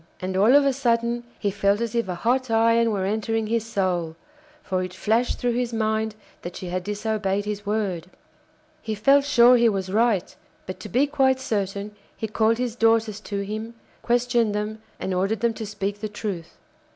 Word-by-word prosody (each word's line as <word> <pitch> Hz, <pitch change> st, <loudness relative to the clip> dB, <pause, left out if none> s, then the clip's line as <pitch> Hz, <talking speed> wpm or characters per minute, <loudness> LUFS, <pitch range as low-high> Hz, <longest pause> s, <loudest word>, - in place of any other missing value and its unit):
And 185 Hz, 0 st, -4 dB
all 215 Hz, +8 st, +5 dB
of 285 Hz, -1 st, +6 dB
a 275 Hz, -, +3 dB
sudden 235 Hz, -2 st, 0 dB
he 205 Hz, -, -1 dB
felt 200 Hz, +1 st, +1 dB
as 235 Hz, -2 st, -2 dB
if 235 Hz, -3 st, 0 dB
a 180 Hz, -, -3 dB
hot 250 Hz, +6 st, 0 dB
iron 230 Hz, +1 st, +3 dB
were 200 Hz, -3 st, -1 dB
entering 220 Hz, +2 st, -1 dB
his 225 Hz, 0 st, 0 dB
soul, 180 Hz, -6 st, -1 dB, 0.5 s
for 185 Hz, -6 st, -1 dB
it 185 Hz, 0 st, -5 dB
flashed 225 Hz, +5 st, +1 dB
through 245 Hz, -1 st, 0 dB
his 245 Hz, 0 st, -1 dB
mind 220 Hz, -1 st, 0 dB, 0.3 s
that 175 Hz, +1 st, -7 dB
she 180 Hz, -, -6 dB
had 180 Hz, 0 st, -2 dB
disobeyed 205 Hz, -1 st, -1 dB
his 205 Hz, -1 st, -5 dB
word. 195 Hz, -5 st, -2 dB, 0.7 s
He 220 Hz, -1 st, -3 dB
felt 275 Hz, +7 st, +4 dB
sure 250 Hz, -3 st, +6 dB
he 235 Hz, -1 st, +4 dB
was 190 Hz, -3 st, -3 dB
right; 215 Hz, -3 st, +1 dB, 0.3 s
but 185 Hz, 0 st, -7 dB
to -, -, -8 dB
be 260 Hz, +4 st, +3 dB
quite 265 Hz, -2 st, +2 dB
certain 205 Hz, -3 st, -3 dB, 0.2 s
he 220 Hz, -, -3 dB
called 220 Hz, +2 st, +2 dB
his 245 Hz, -2 st, -2 dB
daughters 225 Hz, -2 st, +2 dB
to 200 Hz, -1 st, -4 dB
him, 215 Hz, +3 st, -5 dB, 0.3 s
questioned 240 Hz, -3 st, +1 dB
them, 215 Hz, +1 st, -3 dB, 0.2 s
and 190 Hz, -, -2 dB
ordered 195 Hz, +4 st, 0 dB
them 235 Hz, -1 st, +2 dB
to 220 Hz, -1 st, -6 dB
speak 205 Hz, 0 st, -3 dB
the 215 Hz, -, -3 dB
truth. 200 Hz, -5 st, -6 dB
220 Hz, 190 wpm, -24 LUFS, 200-235 Hz, 0.7 s, of